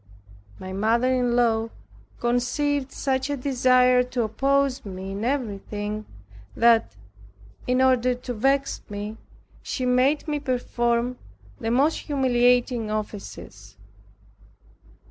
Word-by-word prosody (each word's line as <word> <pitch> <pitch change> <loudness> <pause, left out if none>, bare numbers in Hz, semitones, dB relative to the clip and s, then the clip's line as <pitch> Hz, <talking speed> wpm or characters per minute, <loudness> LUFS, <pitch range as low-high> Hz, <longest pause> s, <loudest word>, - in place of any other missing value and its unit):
My 185 0 -7
mother 230 +6 +2
in 245 -2 +1
law 230 -2 +2 0.5
conceived 260 +3 0
such 265 0 -1
a 285 - -1
desire 255 -1 +4
to 250 -1 -2
oppose 275 +4 +1
me 190 -1 -7
in 200 +2 -5
everything, 215 -4 -3 0.5
that, 230 -1 +3 0.7
in 255 +1 +3
order 255 -1 +3
to 250 0 -6
vex 270 +4 0
me, 205 +1 -6 0.4
she 255 - -3
made 255 +5 +2
me 295 -1 -1
perform 245 -2 -1 0.4
the 225 - -2
most 275 +7 +2
humiliating 245 -4 +2
offices. 150 - -7
245 Hz, 105 wpm, -24 LUFS, 220-260 Hz, 0.7 s, desire